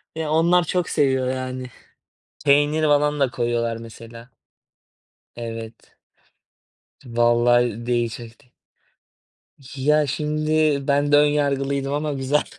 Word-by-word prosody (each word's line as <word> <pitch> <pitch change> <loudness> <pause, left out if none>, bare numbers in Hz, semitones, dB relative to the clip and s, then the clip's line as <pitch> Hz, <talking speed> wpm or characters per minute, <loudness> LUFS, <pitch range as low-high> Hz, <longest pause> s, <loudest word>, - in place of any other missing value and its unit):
Eee, 160 -1 -3
onlar 170 +3 +3
çok 180 +1 -2
seviyor, 130 -3 +1
yani. 130 0 -4 0.8
Peynir 145 +2 +3
falan 150 0 +2
da 135 -3 +2
koyuyorlar, 120 -1 -1
mesela. 115 +1 -12 1.1
Evet. 115 -1 -9 1.1
Vallahi 120 0 +2
değişikti. 120 0 -4 1.2
Ya, 150 +2 +2
şimdi 155 0 0
ben 145 +1 +1
de - - +7
ön 150 0 +5
yargılıydım 140 -1 -1
ama 150 0 -2
güzel. 135 +2 0
135 Hz, 100 wpm, -22 LUFS, 120-150 Hz, 1.2 s, de